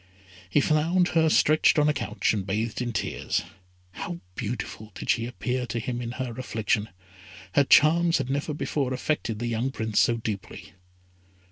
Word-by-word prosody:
He 145 Hz, -, +3 dB
found 165 Hz, +5 st, +2 dB
her 160 Hz, -1 st, +3 dB
stretched 155 Hz, +1 st, +4 dB
on 150 Hz, 0 st, +4 dB
a 150 Hz, -, +3 dB
couch, 110 Hz, -6 st, -1 dB
and 105 Hz, -3 st, -1 dB
bathed 105 Hz, +4 st, -2 dB
in 120 Hz, -1 st, -2 dB
tears. 110 Hz, -, -2 dB, 0.5 s
How 85 Hz, -1 st, -6 dB
beautiful 110 Hz, 0 st, -5 dB
did -, -, 0 dB
she 115 Hz, 0 st, 0 dB
appear 125 Hz, +1 st, -3 dB
to 120 Hz, -, -3 dB
him 120 Hz, +1 st, -3 dB
in 120 Hz, 0 st, -4 dB
her 130 Hz, -2 st, -4 dB
affliction. 110 Hz, -3 st, -1 dB, 0.6 s
Her 140 Hz, -, +4 dB
charms 165 Hz, +4 st, +5 dB
had -, -, -2 dB
never 140 Hz, +3 st, -2 dB
before 135 Hz, -3 st, -1 dB
affected 125 Hz, -5 st, -2 dB
the 120 Hz, -, -3 dB
young 120 Hz, +2 st, -1 dB
Prince 110 Hz, -5 st, -1 dB
so 120 Hz, -, +3 dB
deeply. 110 Hz, -3 st, -6 dB
125 Hz, 165 wpm, -26 LUFS, 110-150 Hz, 0.6 s, charms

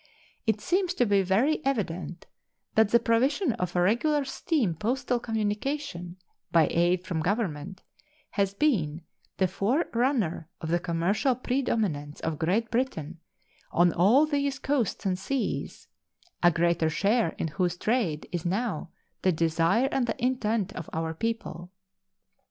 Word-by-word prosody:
It 220 Hz, -1 st, +2 dB
seems 365 Hz, -, 0 dB
to 245 Hz, -, +3 dB
be 200 Hz, -2 st, +3 dB
very 230 Hz, -, +2 dB
evident 185 Hz, -9 st, -2 dB, 0.5 s
that 220 Hz, -1 st, +4 dB
the 235 Hz, -, +5 dB
provision 255 Hz, -, +2 dB
of 180 Hz, -6 st, -3 dB
regular 240 Hz, -, +2 dB
steam 265 Hz, -, 0 dB
postal 245 Hz, -, -1 dB
communication 215 Hz, -, -3 dB, 0.3 s
by 165 Hz, -2 st, +4 dB
aid 175 Hz, +2 st, +2 dB
from 175 Hz, -3 st, -2 dB
government 185 Hz, -1 st, -2 dB, 0.5 s
has 200 Hz, -1 st, 0 dB
been 170 Hz, -, +1 dB, 0.3 s
the 190 Hz, -, +3 dB
forerunner 230 Hz, -, 0 dB
of 160 Hz, -, -5 dB
the 175 Hz, +1 st, +2 dB
commercial 180 Hz, +9 st, +1 dB
predominance 220 Hz, -, -1 dB
of 160 Hz, -2 st, -3 dB
Great 195 Hz, +8 st, 0 dB
Britain 175 Hz, -, -2 dB, 0.5 s
on 175 Hz, -1 st, +4 dB
all 225 Hz, -, +5 dB
these 280 Hz, -2 st, -1 dB
coasts 270 Hz, -8 st, -1 dB
and 185 Hz, -1 st, 0 dB
seas, 270 Hz, +6 st, -3 dB, 0.5 s
a 175 Hz, -, +7 dB
greater 170 Hz, -1 st, +2 dB
share 205 Hz, +3 st, +1 dB
in 160 Hz, -, -2 dB
whose 175 Hz, +3 st, -1 dB
trade 205 Hz, -9 st, 0 dB
is 175 Hz, -3 st, -3 dB
now 190 Hz, -2 st, -2 dB, 0.3 s
the 185 Hz, -, +3 dB
desire 165 Hz, +8 st, +2 dB
and 255 Hz, -3 st, +1 dB
the -, -, -3 dB
intent 230 Hz, -5 st, 0 dB
of 165 Hz, -, -7 dB
our 160 Hz, 0 st, -2 dB
people. 175 Hz, -3 st, -4 dB
200 Hz, 135 wpm, -27 LUFS, 170-245 Hz, 0.5 s, a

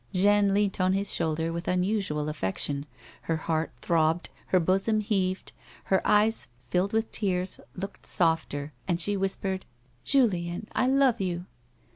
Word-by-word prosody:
Jeanne 200 Hz, +1 st, +4 dB
leant 200 Hz, -1 st, +1 dB
on 185 Hz, 0 st, +3 dB
his 195 Hz, +1 st, +1 dB
shoulder 160 Hz, +1 st, 0 dB
with 170 Hz, +1 st, -5 dB
unusual 180 Hz, -5 st, 0 dB
affection, 140 Hz, +2 st, -2 dB, 0.3 s
her 165 Hz, -, -1 dB
heart 160 Hz, 0 st, -1 dB
throbbed, 165 Hz, 0 st, +1 dB, 0.2 s
her 185 Hz, -, +3 dB
bosom 195 Hz, +5 st, +2 dB
heaved, 195 Hz, -3 st, -1 dB, 0.3 s
her 190 Hz, -, +2 dB
eyes, 215 Hz, +2 st, +3 dB, 0.2 s
filled 185 Hz, +3 st, +1 dB
with 220 Hz, 0 st, 0 dB
tears, 185 Hz, -3 st, -1 dB, 0.2 s
looked 195 Hz, +2 st, -7 dB
softer, 160 Hz, -3 st, 0 dB
and 175 Hz, -2 st, 0 dB
she 205 Hz, +4 st, 0 dB
whispered: 190 Hz, -1 st, -1 dB, 0.2 s
" 120 Hz, -1 st, -36 dB
Julien, 200 Hz, -8 st, +1 dB
I 250 Hz, -, +2 dB
love 265 Hz, -4 st, +3 dB
you 175 Hz, -2 st, -2 dB
185 Hz, 145 wpm, -27 LUFS, 165-205 Hz, 0.3 s, Jeanne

